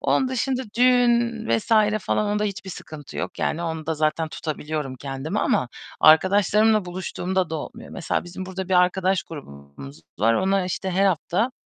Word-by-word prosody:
Onun 260 Hz, -, +2 dB
dışında 260 Hz, +1 st, -1 dB, 0.2 s
düğün 240 Hz, -2 st, +3 dB
vs. 115 Hz, -1 st, 0 dB, 0.3 s
falan 210 Hz, -, 0 dB
onda 210 Hz, +1 st, 0 dB
hiçbir 200 Hz, -1 st, -4 dB
sıkıntı 150 Hz, -4 st, -10 dB
yok -, -, -4 dB
yani 170 Hz, -, -1 dB
onda 160 Hz, -1 st, -3 dB
zaten 155 Hz, +1 st, 0 dB
tutabiliyorum 150 Hz, -4 st, -4 dB
kendimi 140 Hz, -, -4 dB
ama 125 Hz, -, +1 dB, 0.3 s
arkadaşlarımla 200 Hz, +6 st, +5 dB
buluştuğumda 180 Hz, 0 st, -2 dB
da -, -, -3 dB
olmuyor. 150 Hz, -, -8 dB
Mesela 175 Hz, -, -2 dB
bizim 185 Hz, +2 st, -7 dB
burada 190 Hz, 0 st, -5 dB
bir 190 Hz, -, +1 dB
arkadaş 185 Hz, +1 st, +3 dB
grubumuz 70 Hz, -, -11 dB, 0.2 s
var. 115 Hz, +4 st, +3 dB
Onlar 190 Hz, +3 st, +1 dB
işte 185 Hz, +2 st, -3 dB
her 190 Hz, +2 st, +2 dB
hafta, 190 Hz, +6 st, 0 dB
180 Hz, 155 wpm, -23 LUFS, 155-205 Hz, 0.3 s, arkadaşlarımla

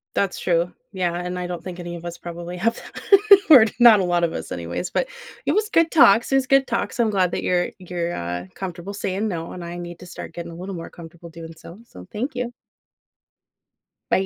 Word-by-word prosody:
That's 195 Hz, -2 st, 0 dB
true. 170 Hz, 0 st, +1 dB, 0.2 s
Yeah, 180 Hz, -3 st, -1 dB
and 180 Hz, +1 st, -4 dB
I 180 Hz, -, -3 dB
don't 175 Hz, -1 st, -6 dB
think 185 Hz, -1 st, -8 dB
any 175 Hz, -1 st, -6 dB
of 170 Hz, -, -11 dB
us 170 Hz, 0 st, -6 dB
probably 175 Hz, +1 st, -7 dB
have 230 Hz, +6 st, 0 dB
that. 400 Hz, -2 st, +2 dB, 0.3 s
Or 260 Hz, -7 st, +10 dB
not 235 Hz, -4 st, +8 dB
a 185 Hz, -, +1 dB
lot 175 Hz, -1 st, +1 dB
of 165 Hz, -, -1 dB
us, -, -, -6 dB
anyways. 85 Hz, -, -4 dB
But, -, -, -1 dB, 0.4 s
it -, -, +2 dB
was 425 Hz, +1 st, +1 dB
good 330 Hz, -5 st, +3 dB
talks, 240 Hz, -5 st, +5 dB
It -, -, +4 dB
was 265 Hz, -1 st, +1 dB
good 275 Hz, 0 st, +4 dB
talks. -, -, -2 dB
I'm 225 Hz, -2 st, +3 dB
glad 185 Hz, -3 st, +2 dB
that -, -, -2 dB
you're 175 Hz, -1 st, +1 dB
you're, 175 Hz, -2 st, -4 dB
uh, 90 Hz, +1 st, -4 dB
comfortable 190 Hz, +1 st, -6 dB
saying 200 Hz, +2 st, -2 dB
no, 165 Hz, -4 st, -5 dB
and 180 Hz, -, -7 dB
I 170 Hz, +1 st, -6 dB
need 175 Hz, -1 st, -8 dB
to 180 Hz, -, -11 dB
start -, -, -9 dB
getting 170 Hz, 0 st, -6 dB
a -, -, -9 dB
little 190 Hz, +2 st, -6 dB
more 165 Hz, -, -7 dB
comfortable 170 Hz, 0 st, -12 dB
doing 165 Hz, 0 st, -10 dB
so. 170 Hz, +3 st, -12 dB
So 90 Hz, -, -13 dB
thank 250 Hz, +6 st, -3 dB
you. 245 Hz, -1 st, -3 dB, 1.6 s
Bye. -, -, +4 dB
180 Hz, 225 wpm, -22 LUFS, 170-210 Hz, 1.6 s, Or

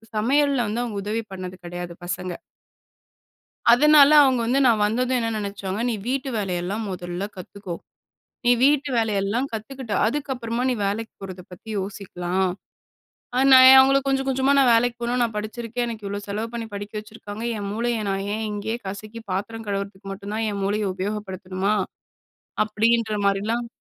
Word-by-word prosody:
சமையலல்ல 270 Hz, +3 st, +2 dB
வந்து 225 Hz, +3 st, -2 dB
அவங்க 225 Hz, -4 st, -4 dB
உதவி 220 Hz, +2 st, -2 dB
பண்ணது 185 Hz, -1 st, -6 dB
கெடையாது 175 Hz, 0 st, -6 dB
பசங்க. 180 Hz, +1 st, -4 dB, 1.4 s
அதனால 300 Hz, +2 st, +7 dB
அவங்க 260 Hz, -3 st, +3 dB
வந்து 255 Hz, +4 st, +2 dB
நான் 220 Hz, -3 st, +3 dB
வந்ததும் 250 Hz, +4 st, +1 dB
என்ன 230 Hz, -, -1 dB
நெனைச்சாங்க, 200 Hz, -1 st, -4 dB
"நீ 230 Hz, -, 0 dB
வீட்டு 270 Hz, +1 st, -1 dB
வேலையெல்லாம் 195 Hz, +2 st, -2 dB
1ல 175 Hz, 0 st, -5 dB
கத்துக்கோ. 185 Hz, 0 st, -7 dB, 0.7 s
நீ 245 Hz, -, +4 dB
வீட்டு 290 Hz, +1 st, +3 dB
வேலையெல்லாம் 220 Hz, +2 st, 0 dB
கத்துக்கிட்டு, 225 Hz, 0 st, -5 dB
அதுக்கப்பறமா 245 Hz, -2 st, -2 dB
நீ -, -, +1 dB
வேலைக்கு 220 Hz, +3 st, -3 dB
போறத 185 Hz, -1 st, -7 dB
பத்தி 180 Hz, -, -13 dB
யோசிக்கலாம்." 190 Hz, -1 st, -2 dB, 0.9 s
அது 265 Hz, -, +4 dB
நான் 260 Hz, 0 st, +10 dB
ஏன் 265 Hz, -, +10 dB
அவங்கள 270 Hz, +1 st, +5 dB
கொஞ்சம் 270 Hz, 0 st, +1 dB
கொஞ்சமா, 265 Hz, +1 st, +2 dB
"நான் 255 Hz, -3 st, +5 dB
வேலைக்கு 235 Hz, +1 st, +2 dB
போகணும். 245 Hz, +1 st, 0 dB
நான் 225 Hz, -3 st, -2 dB
படிச்சிருக்கேன். 235 Hz, +3 st, -3 dB
எனக்கு 220 Hz, -3 st, -6 dB
இவ்வளோ 200 Hz, +1 st, -4 dB
செலவு 210 Hz, +3 st, -3 dB
பண்ணி 230 Hz, -1 st, -4 dB
படிக்க 205 Hz, +1 st, -6 dB
வச்சுருக்காங்க. 215 Hz, 0 st, -9 dB
என் 200 Hz, -1 st, -4 dB
மூளைய 230 Hz, +1 st, -1 dB
நான் 195 Hz, 0 st, -1 dB
ஏன் 220 Hz, 0 st, -3 dB
இங்கேயே 215 Hz, +3 st, -3 dB
கசக்கி 215 Hz, +4 st, -7 dB
பாத்திரம் 220 Hz, +4 st, -4 dB
கழுவுறதுக்கு 200 Hz, 0 st, -4 dB
மட்டும் 200 Hz, +1 st, -7 dB
தான் 225 Hz, 0 st, -1 dB
என் 200 Hz, -1 st, -4 dB
மூளைய 205 Hz, +2 st, 0 dB
உபயோகப்படுத்தணுமா?" 190 Hz, 0 st, -2 dB, 0.9 s
அப்படீன்ற 220 Hz, +1 st, +1 dB
மாரிலாம் 215 Hz, +4 st, 0 dB
215 Hz, 155 wpm, -23 LUFS, 200-240 Hz, 1.4 s, நான்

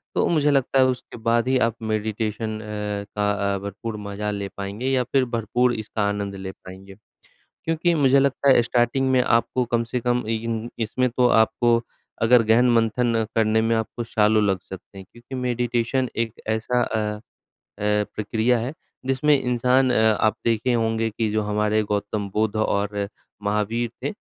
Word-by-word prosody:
तो -, -, +2 dB
मुझे 150 Hz, -3 st, +3 dB
लगता 135 Hz, -1 st, +2 dB
है 130 Hz, -, +6 dB
उसके 125 Hz, -1 st, -4 dB
बाद 115 Hz, +1 st, +2 dB
ही 130 Hz, 0 st, +3 dB
आप 115 Hz, -1 st, +1 dB, 0.2 s
मेडिटेशन 110 Hz, 0 st, -2 dB
अ, 105 Hz, -1 st, -4 dB
का 100 Hz, -1 st, 0 dB
भरपूर 100 Hz, +3 st, -6 dB
मज़ा 105 Hz, +1 st, -4 dB
ले 100 Hz, -1 st, -4 dB
पाएँगे 100 Hz, +6 st, -4 dB
या 130 Hz, -2 st, +2 dB
फिर 130 Hz, +1 st, +1 dB
भरपूर 120 Hz, +2 st, +1 dB
इसका 110 Hz, -1 st, -4 dB
आनंद 100 Hz, -1 st, -3 dB
ले 95 Hz, 0 st, -6 dB
पाएँगे। 95 Hz, +1 st, -13 dB, 0.7 s
क्योंकि 165 Hz, +1 st, +1 dB
मुझे 140 Hz, -2 st, +4 dB
लगता 140 Hz, 0 st, +2 dB
है -, -, +5 dB
स्टार्टिंग 120 Hz, +3 st, +1 dB
में 130 Hz, -1 st, +4 dB
आपको 120 Hz, +2 st, +1 dB
कम 115 Hz, 0 st, 0 dB
से 125 Hz, -, 0 dB
कम 120 Hz, +1 st, 0 dB
इन 115 Hz, +1 st, -2 dB
इसमें 125 Hz, +3 st, 0 dB
तो 125 Hz, +1 st, +2 dB
आपको 115 Hz, +1 st, +3 dB, 0.4 s
अगर 120 Hz, +1 st, +6 dB
गहन 120 Hz, +2 st, +5 dB
मंथन 115 Hz, 0 st, +1 dB
करने 110 Hz, 0 st, +3 dB
में 115 Hz, 0 st, +1 dB
आपको 110 Hz, +1 st, -3 dB
सालों 110 Hz, -1 st, +2 dB
लग 95 Hz, -2 st, +1 dB
सकते 95 Hz, +1 st, -11 dB
हैं 95 Hz, -, -9 dB
क्योंकि 120 Hz, +3 st, -10 dB
मेडिटेशन 125 Hz, 0 st, -1 dB, 0.2 s
एक 115 Hz, -, -14 dB
ऐसा 110 Hz, +3 st, 0 dB
अ 105 Hz, -1 st, -2 dB, 0.6 s
अ, 105 Hz, 0 st, +1 dB
प्रक्रिया 110 Hz, +3 st, +1 dB
है, 125 Hz, +5 st, -3 dB, 0.3 s
जिसमें 135 Hz, +2 st, +3 dB
इंसान 125 Hz, +1 st, +2 dB
अ, -, -, +2 dB, 0.2 s
आप 110 Hz, -, +2 dB
देखे 115 Hz, +2 st, +1 dB
होंगे 115 Hz, -1 st, 0 dB
कि 110 Hz, 0 st, -2 dB
जो 110 Hz, 0 st, 0 dB
हमारे 105 Hz, +1 st, +1 dB
गौतम 105 Hz, 0 st, -2 dB
बुद्ध 110 Hz, 0 st, 0 dB
और 100 Hz, -1 st, -1 dB, 0.3 s
महावीर 105 Hz, +3 st, -1 dB
थे, -, -, -1 dB
115 Hz, 170 wpm, -23 LUFS, 105-125 Hz, 0.7 s, है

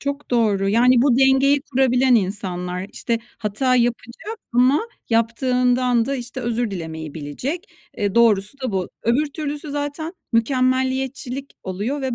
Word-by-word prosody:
Çok 280 Hz, +1 st, -4 dB
doğru. 210 Hz, -5 st, +2 dB
Yani, 240 Hz, +3 st, +5 dB
bu 255 Hz, -3 st, +3 dB
dengeyi 270 Hz, +1 st, +4 dB
kurabilen 255 Hz, -2 st, +3 dB
insanlar, 185 Hz, -3 st, -1 dB
işte, 235 Hz, -1 st, -1 dB, 0.2 s
hata 250 Hz, +5 st, +1 dB
yapacak 240 Hz, -, -2 dB
ama 255 Hz, +5 st, +4 dB, 0.3 s
yaptığından 245 Hz, +1 st, +2 dB
da, 275 Hz, -, -2 dB
işte, 250 Hz, +1 st, -6 dB
özür 235 Hz, -2 st, -1 dB
dilemeyi 160 Hz, -4 st, -6 dB
bilecek. 245 Hz, -, -5 dB, 0.3 s
Eee, 205 Hz, -2 st, -1 dB
doğrusu 230 Hz, +2 st, +3 dB
da 255 Hz, -5 st, -3 dB
bu. 185 Hz, -2 st, -1 dB
Öbür 255 Hz, +7 st, +2 dB
türlüsü 295 Hz, -1 st, -5 dB
zaten 290 Hz, +3 st, -3 dB, 0.2 s
mükemmeliyetçilik 260 Hz, +2 st, 0 dB
oluyor 205 Hz, +10 st, -3 dB
ve 260 Hz, -2 st, -2 dB
245 Hz, 135 wpm, -21 LUFS, 215-270 Hz, 0.3 s, Yani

